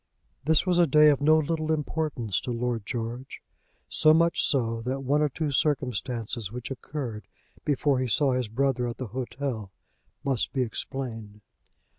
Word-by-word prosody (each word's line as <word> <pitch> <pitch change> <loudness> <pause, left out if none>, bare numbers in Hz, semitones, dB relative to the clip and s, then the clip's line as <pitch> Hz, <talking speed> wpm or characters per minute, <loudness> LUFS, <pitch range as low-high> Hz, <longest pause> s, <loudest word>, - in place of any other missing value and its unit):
This 160 +1 +4
was 180 -1 +2
a 170 - +5
day 150 +2 +7
of 140 -1 +2
no 155 +2 +6
little 155 0 0
importance 150 - -1
to 125 - -4
Lord 120 -2 -2
George; 120 +2 -5 0.5
so 155 0 +5
much 170 +1 +3
so, 115 -4 +1
that 130 +3 -2
one 145 +3 +2
or 150 - +3
two 150 +2 -2
circumstances 125 -6 -1
which 125 +2 -6
occurred 120 -7 -5 0.4
before 145 -2 +2
he 130 - 0
saw 130 +5 +2
his 125 -2 0
brother 125 +2 0
at 120 - -5
the 130 -4 -5
hotel 125 -5 -4 0.5
must 135 -5 0
be 130 - +1
explained. 115 -3 -5
130 Hz, 160 wpm, -27 LUFS, 115-150 Hz, 0.5 s, day